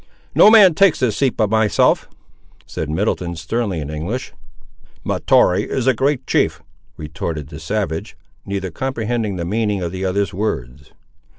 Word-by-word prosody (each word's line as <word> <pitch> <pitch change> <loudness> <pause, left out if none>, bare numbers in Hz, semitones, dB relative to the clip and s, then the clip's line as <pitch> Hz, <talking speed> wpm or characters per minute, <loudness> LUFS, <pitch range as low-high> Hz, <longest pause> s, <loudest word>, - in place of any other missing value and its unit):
"No - - +7
man 210 -5 +7
takes 195 +1 +3
this 120 -5 0
seat 135 -3 0
but 110 -2 +1
myself," 110 -2 +2 0.6
said 80 - -5
Middleton, 85 0 -1
sternly, 95 +3 -2
in 75 0 -5
English. 85 +12 -4 0.7
"Mahtoree 95 +3 +2
is 130 - -2
a 130 - +4
great 135 +3 0
chief!" 85 +3 +1 0.4
retorted 75 -1 -5
the 75 - -9
savage; 95 -1 -3 0.3
neither 95 -2 -4
comprehending 115 -1 -2
the 85 -2 -4
meaning 105 0 -1
of 85 - -3
the 95 +1 -5
other's 95 0 -1
words. 70 - -4
100 Hz, 150 wpm, -19 LUFS, 80-115 Hz, 0.7 s, No